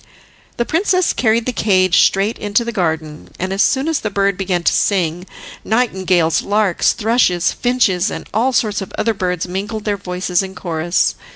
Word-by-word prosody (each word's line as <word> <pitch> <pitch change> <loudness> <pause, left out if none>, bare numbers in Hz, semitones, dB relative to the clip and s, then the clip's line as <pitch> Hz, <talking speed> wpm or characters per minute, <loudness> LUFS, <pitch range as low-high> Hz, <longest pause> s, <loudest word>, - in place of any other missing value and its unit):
The 235 - 0
princess 365 - +1
carried 225 -1 +1
the 255 - -2
cage 185 -5 +3
straight 200 +4 +1
into 205 +3 0
the 235 - -3
garden, 160 -6 -3
and, 185 +1 -3
as 195 - 0
soon 270 +3 +2
as 320 -3 0
the 215 - -3
bird 200 -1 0
began 180 -2 -2
to - - +3
sing, 180 -2 0 0.4
nightingales, 190 -8 +1
larks, 205 -3 +1
thrushes, 220 -6 +1
finches, 220 -6 +1
and - - -7
all 240 +5 +2
sorts 215 -5 0
of 195 - -7
other 225 +1 +1
birds 180 -3 -2
mingled 205 +4 -5
their 205 -1 0
voices 180 -1 -1
in 190 0 -7
chorus. 170 -1 0
195 Hz, 175 wpm, -17 LUFS, 180-225 Hz, 0.4 s, cage